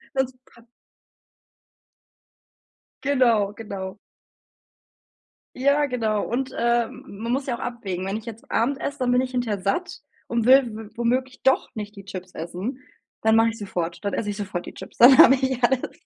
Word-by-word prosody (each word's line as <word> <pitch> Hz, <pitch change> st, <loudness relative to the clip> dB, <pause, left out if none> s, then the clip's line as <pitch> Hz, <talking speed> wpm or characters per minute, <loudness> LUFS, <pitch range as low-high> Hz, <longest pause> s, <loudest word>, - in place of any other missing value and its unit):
Sonst, 260 Hz, -1 st, 0 dB
pa 235 Hz, -, -21 dB, 2.4 s
Genau, 240 Hz, -8 st, +3 dB
genau. 200 Hz, -3 st, -7 dB, 1.6 s
Ja, 280 Hz, +3 st, +3 dB
genau 220 Hz, -5 st, -1 dB
und, 260 Hz, +2 st, -2 dB
äh, 235 Hz, 0 st, +2 dB
m -, -, -12 dB, 0.2 s
man 235 Hz, -, -2 dB
muss 270 Hz, +1 st, -1 dB
ja 245 Hz, -3 st, -1 dB
auch -, -, -11 dB
abwägen. 195 Hz, -7 st, -4 dB
Wenn 195 Hz, +2 st, -2 dB
ich 220 Hz, -, -10 dB
jetzt 230 Hz, 0 st, -10 dB
Abend 270 Hz, +4 st, 0 dB
esse, 285 Hz, 0 st, -4 dB
dann 250 Hz, -1 st, +1 dB
bin 250 Hz, -, +4 dB
ich 255 Hz, -1 st, -3 dB
hinterher 225 Hz, -6 st, -2 dB
satt 350 Hz, -, -2 dB, 0.3 s
und 235 Hz, -1 st, -1 dB
will 265 Hz, +1 st, +7 dB
w 220 Hz, -1 st, -8 dB
womöglich 255 Hz, +2 st, -1 dB
doch 265 Hz, -, +3 dB
nicht 210 Hz, 0 st, -6 dB
die 195 Hz, -, -10 dB
Chips 185 Hz, -2 st, -8 dB
essen. 185 Hz, -, -5 dB, 0.4 s
Dann 220 Hz, 0 st, +4 dB
mache 225 Hz, 0 st, +5 dB
ich 225 Hz, -, -7 dB
sofort 175 Hz, -4 st, -4 dB
dann 200 Hz, -, -1 dB
esse 210 Hz, -, -2 dB
ich 205 Hz, -, -4 dB
sofort 190 Hz, -4 st, -4 dB
die -, -, -9 dB
Chips, -, -, -11 dB
dann 255 Hz, +2 st, +8 dB
habe 270 Hz, -, +9 dB
ich 260 Hz, -1 st, -1 dB
alles. 255 Hz, +1 st, +1 dB
235 Hz, 175 wpm, -24 LUFS, 205-260 Hz, 2.4 s, habe